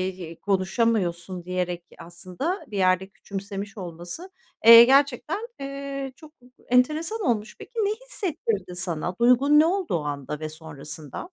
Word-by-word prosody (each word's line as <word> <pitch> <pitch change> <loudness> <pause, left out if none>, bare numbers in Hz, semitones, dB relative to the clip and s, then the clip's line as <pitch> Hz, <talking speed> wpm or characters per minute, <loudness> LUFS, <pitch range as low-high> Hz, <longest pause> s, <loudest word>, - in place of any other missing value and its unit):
y 170 -3 -8
konuşamıyorsun 190 -3 0
diyerek 180 -1 -2 0.2
aslında 185 - -5
bir 205 - -6
yerde 185 0 +2
küçümsemiş 200 +1 -7
olması, 175 - -7 0.4
eee, 230 0 +12
gerçekten, 280 - +2
eee, 275 -1 -5
çok 310 -1 -15 0.3
enteresan 310 - +2
olmuş. 220 - -1
Peki, - - -11
ne 420 -3 +1 0.2
hissettirdi 225 - -3
sana? 175 -1 -2
Duygun 260 +5 +5
ne 315 - +6
olduğu 355 - 0
anda 145 0 -4
ve 155 0 -4
sonrasında? 155 - -8
200 Hz, 125 wpm, -25 LUFS, 175-280 Hz, 0.4 s, eee